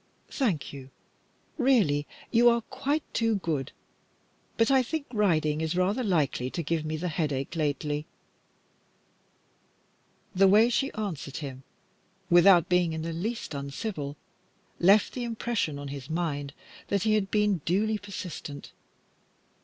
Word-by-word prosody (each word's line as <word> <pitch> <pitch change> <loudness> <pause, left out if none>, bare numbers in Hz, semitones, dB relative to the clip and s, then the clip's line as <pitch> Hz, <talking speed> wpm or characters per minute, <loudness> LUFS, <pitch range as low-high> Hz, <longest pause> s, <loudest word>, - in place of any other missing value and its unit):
"Thank 205 - -1
you. 135 -1 -9 0.7
Really; 200 - +3 0.2
you 240 +1 +6
are 235 0 +2
quite 280 +5 -2
too 225 -1 +2
good, 160 -8 -2 0.9
but 225 +3 +3
I 265 -1 +5
think 290 +4 -3
riding 160 -8 +2
is 160 +1 -1
rather 200 +7 +1
likely 150 - 0
to 170 - -4
give 160 +1 -1
me 155 0 -3
the 180 +3 -3
headache 150 -3 -2
lately." 150 0 -1 2.3
The 195 +1 +5
way 215 +5 +5
she 270 +3 0
answered 180 -10 -4
him, 135 -4 -6 0.7
without 175 -1 +7
being 180 -2 +2
in 160 0 -4
the 165 0 -3
least 210 +2 -4
uncivil, 140 +1 -5 0.6
left 200 +4 +5
the 250 - -4
impression 230 -9 -2
on 145 0 -6
his 140 -1 -7
mind 145 -4 -2 0.3
that 200 -2 0
he 220 - +2
had 205 -2 +1
been 210 -5 +1
duly 210 +5 +1
persistent. 180 -8 -7
175 Hz, 135 wpm, -28 LUFS, 150-220 Hz, 2.3 s, without